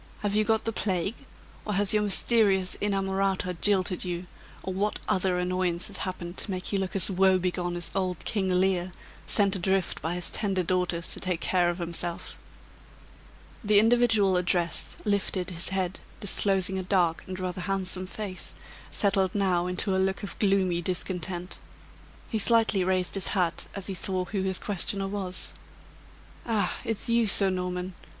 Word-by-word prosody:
Have 205 Hz, -1 st, -1 dB
you 215 Hz, +1 st, +3 dB
got 220 Hz, +1 st, +1 dB
the 225 Hz, -, -1 dB
plague? 195 Hz, -1 st, -1 dB, 0.5 s
or 210 Hz, -, -3 dB
has 205 Hz, +1 st, +2 dB
your 210 Hz, -, +3 dB
mysterious 200 Hz, -2 st, +3 dB
inamorata 195 Hz, -2 st, 0 dB
jilted 190 Hz, -3 st, +2 dB
you? 175 Hz, -1 st, -4 dB, 0.4 s
or 190 Hz, -, -3 dB
what 205 Hz, +3 st, -1 dB
other 185 Hz, -1 st, +1 dB
annoyance 180 Hz, -1 st, 0 dB
has 200 Hz, -, -6 dB
happened 180 Hz, -1 st, -4 dB
to -, -, +1 dB
make 185 Hz, +1 st, -4 dB
you 200 Hz, -, +2 dB
look 190 Hz, 0 st, -3 dB
as 195 Hz, +1 st, +3 dB
woebegone 185 Hz, -2 st, +1 dB
as 175 Hz, -1 st, -2 dB
old 185 Hz, -3 st, -2 dB
King 195 Hz, -4 st, -1 dB
Lear, 185 Hz, -1 st, +1 dB, 0.3 s
sent 200 Hz, -2 st, +3 dB
adrift 190 Hz, 0 st, 0 dB
by 165 Hz, +2 st, -2 dB
his 180 Hz, -1 st, -2 dB
tender 195 Hz, -4 st, 0 dB
daughters 180 Hz, -1 st, +1 dB
to -, -, -2 dB
take 180 Hz, -2 st, -2 dB
care 175 Hz, 0 st, +2 dB
of 175 Hz, -, -2 dB
himself?" 170 Hz, 0 st, -4 dB, 1.3 s
The 210 Hz, -1 st, +3 dB
individual 220 Hz, -4 st, +4 dB
addressed 175 Hz, -2 st, 0 dB
lifted 200 Hz, -3 st, -1 dB
his 170 Hz, 0 st, +3 dB
head, 190 Hz, -1 st, -2 dB, 0.2 s
disclosing 190 Hz, -1 st, +2 dB
a -, -, -1 dB
dark 180 Hz, -3 st, +1 dB
and 185 Hz, 0 st, -6 dB
rather 185 Hz, 0 st, -3 dB
handsome 185 Hz, -1 st, -1 dB
face, 195 Hz, -1 st, -5 dB, 0.3 s
settled 195 Hz, -2 st, +2 dB
now 180 Hz, -3 st, +1 dB
into 185 Hz, +2 st, 0 dB
a 190 Hz, -, +2 dB
look 190 Hz, +2 st, -1 dB
of 200 Hz, -, -7 dB
gloomy 190 Hz, -4 st, +2 dB
discontent. 180 Hz, 0 st, -3 dB, 0.7 s
He 220 Hz, -, -2 dB
slightly 225 Hz, -3 st, +4 dB
raised 185 Hz, 0 st, 0 dB
his 195 Hz, -3 st, +5 dB
hat 180 Hz, -4 st, 0 dB
as 195 Hz, -2 st, -5 dB
he 195 Hz, -, -3 dB
saw 185 Hz, 0 st, -1 dB
who 195 Hz, +2 st, -3 dB
his 190 Hz, -1 st, -1 dB
questioner 195 Hz, -1 st, -1 dB
was. 195 Hz, -2 st, -2 dB, 0.9 s
"Ah! 210 Hz, -5 st, 0 dB
it's 225 Hz, +1 st, -2 dB
you, 235 Hz, -1 st, +3 dB
Sir 195 Hz, 0 st, +4 dB
Norman! 180 Hz, 0 st, -3 dB
190 Hz, 165 wpm, -27 LUFS, 180-200 Hz, 1.3 s, his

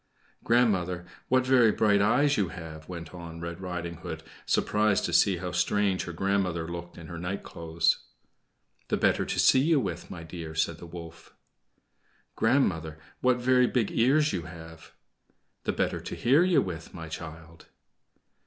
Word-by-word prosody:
"Grandmother, 95 Hz, -7 st, +2 dB, 0.2 s
what 130 Hz, 0 st, +3 dB
very 125 Hz, -4 st, +5 dB
bright 105 Hz, -1 st, +3 dB
eyes 145 Hz, +8 st, +3 dB
you 100 Hz, -6 st, +1 dB
have!" 80 Hz, -2 st, -9 dB
went 85 Hz, -2 st, -7 dB
on 85 Hz, -2 st, -8 dB
Red 85 Hz, +2 st, -6 dB
Riding 90 Hz, -2 st, -4 dB
Hood, -, -, -7 dB, 0.2 s
surprised 105 Hz, -1 st, +2 dB
to 85 Hz, -, -3 dB
see 90 Hz, +2 st, +4 dB
how 90 Hz, +1 st, -4 dB
strange 95 Hz, +1 st, +1 dB
her 90 Hz, -, -5 dB
grandmother 90 Hz, -2 st, 0 dB
looked 85 Hz, 0 st, -7 dB
in 85 Hz, -, -9 dB
her 85 Hz, +1 st, -7 dB
nightclothes. 85 Hz, -2 st, -1 dB, 0.9 s
"The -, -, 0 dB
better -, -, +2 dB
to -, -, -2 dB
see 130 Hz, -, +6 dB
you 155 Hz, +2 st, +3 dB
with, 90 Hz, -8 st, -4 dB
my 85 Hz, -2 st, -7 dB
dear," 80 Hz, -1 st, -7 dB
said 80 Hz, +1 st, 0 dB
the 85 Hz, -, -10 dB
wolf. 85 Hz, -1 st, -11 dB, 1.0 s
"Grandmother, 90 Hz, -, +1 dB, 0.2 s
what 125 Hz, -1 st, +3 dB
very 125 Hz, 0 st, +4 dB
big 120 Hz, -5 st, 0 dB
ears 145 Hz, +6 st, +3 dB
you 90 Hz, -, -1 dB
have!" 80 Hz, 0 st, -11 dB, 0.7 s
"The -, -, +1 dB
better -, -, -1 dB
to -, -, -6 dB
hear 135 Hz, +8 st, +4 dB
you 180 Hz, -2 st, +3 dB
with, 85 Hz, -4 st, -7 dB
my 80 Hz, -1 st, -7 dB
child." 80 Hz, 0 st, -9 dB
90 Hz, 160 wpm, -28 LUFS, 85-110 Hz, 1.0 s, see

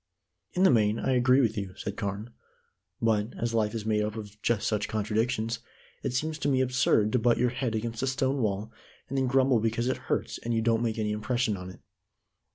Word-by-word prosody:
"In 180 Hz, -, +2 dB
the 190 Hz, -, +7 dB
main, 110 Hz, -2 st, +3 dB
I 135 Hz, -, 0 dB
agree 130 Hz, +1 st, +4 dB
with 115 Hz, -3 st, +1 dB
you," 95 Hz, -3 st, -4 dB
said 100 Hz, -, -5 dB
Carne. 105 Hz, +4 st, -4 dB, 0.7 s
"But, 110 Hz, 0 st, +1 dB
as 115 Hz, 0 st, -2 dB
life 110 Hz, -1 st, +1 dB
is 110 Hz, -2 st, -4 dB
made 110 Hz, -1 st, +2 dB
up 105 Hz, 0 st, -2 dB
of 105 Hz, -1 st, -9 dB
just 115 Hz, -2 st, +1 dB
such 105 Hz, -2 st, 0 dB
contradictions, 110 Hz, +2 st, -1 dB, 0.4 s
it -, -, -2 dB
seems 155 Hz, +4 st, -1 dB
to -, -, -1 dB
me 135 Hz, -2 st, +3 dB
absurd 125 Hz, -4 st, +2 dB
to 125 Hz, -, +2 dB
butt 120 Hz, +1 st, +3 dB
your 125 Hz, 0 st, +2 dB
head 125 Hz, -2 st, -2 dB
against 115 Hz, 0 st, -3 dB
a 135 Hz, -, 0 dB
stone 130 Hz, +1 st, 0 dB
wall, 105 Hz, 0 st, -1 dB, 0.4 s
and 135 Hz, -, -4 dB
then 130 Hz, -, +1 dB
grumble 130 Hz, -1 st, +3 dB
because 115 Hz, +2 st, 0 dB
it 130 Hz, -, 0 dB
hurts -, -, -1 dB
and 115 Hz, 0 st, -2 dB
you 115 Hz, -, +2 dB
don't 115 Hz, 0 st, +2 dB
make 115 Hz, -2 st, -1 dB
any 105 Hz, -1 st, -1 dB
impression 110 Hz, +1 st, 0 dB
on 90 Hz, -1 st, -7 dB
it. 95 Hz, -, -13 dB
115 Hz, 220 wpm, -28 LUFS, 105-125 Hz, 0.7 s, the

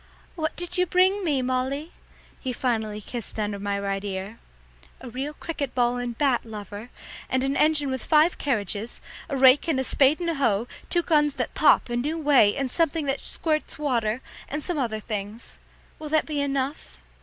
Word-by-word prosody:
"What 315 Hz, -3 st, -2 dB
did 355 Hz, +1 st, -2 dB
you 360 Hz, -, +3 dB
bring 375 Hz, +3 st, +3 dB
me, 285 Hz, -6 st, +1 dB
Molly?" 260 Hz, +5 st, -1 dB, 0.5 s
he 255 Hz, -, -3 dB
finally 220 Hz, -4 st, -1 dB
kissed 235 Hz, +1 st, -6 dB
under 205 Hz, -1 st, -2 dB
my 200 Hz, 0 st, -2 dB
right 195 Hz, 0 st, -2 dB
ear. 195 Hz, +2 st, -5 dB, 0.6 s
"A 255 Hz, -2 st, -9 dB
real 275 Hz, +5 st, -4 dB
cricket 290 Hz, -6 st, -4 dB
ball 245 Hz, -1 st, +2 dB
and 240 Hz, -2 st, -4 dB
bat, 270 Hz, -5 st, +2 dB
lover, 210 Hz, 0 st, -8 dB, 0.4 s
and 260 Hz, 0 st, +1 dB
an 270 Hz, +1 st, 0 dB
engine 300 Hz, -3 st, +3 dB
with 260 Hz, -, -3 dB
five 315 Hz, +2 st, +4 dB
carriages, 215 Hz, -4 st, -2 dB, 0.3 s
a 280 Hz, -, -1 dB
rake 265 Hz, +4 st, +6 dB
and 305 Hz, -5 st, +1 dB
a -, -, +1 dB
spade 275 Hz, +4 st, +3 dB
and 340 Hz, -1 st, 0 dB
a -, -, -1 dB
hoe, 235 Hz, -6 st, +1 dB, 0.2 s
two 345 Hz, -1 st, +1 dB
guns 295 Hz, -3 st, +3 dB
that -, -, -3 dB
pop -, -, +4 dB
a 240 Hz, -, -3 dB
new 295 Hz, +7 st, -1 dB
way, 280 Hz, -9 st, +4 dB
and 270 Hz, -2 st, -2 dB
something 325 Hz, -1 st, +1 dB
that 270 Hz, 0 st, 0 dB
squirts 310 Hz, -2 st, -2 dB
water, 245 Hz, -5 st, 0 dB, 0.3 s
and 295 Hz, +1 st, -3 dB
some 350 Hz, -4 st, -1 dB
other 225 Hz, -4 st, -1 dB
things. 210 Hz, +1 st, -6 dB, 0.4 s
Will 310 Hz, -1 st, -6 dB
that 310 Hz, 0 st, +2 dB
be 295 Hz, -2 st, -2 dB
enough?" 275 Hz, -, -2 dB
265 Hz, 190 wpm, -25 LUFS, 225-300 Hz, 0.6 s, rake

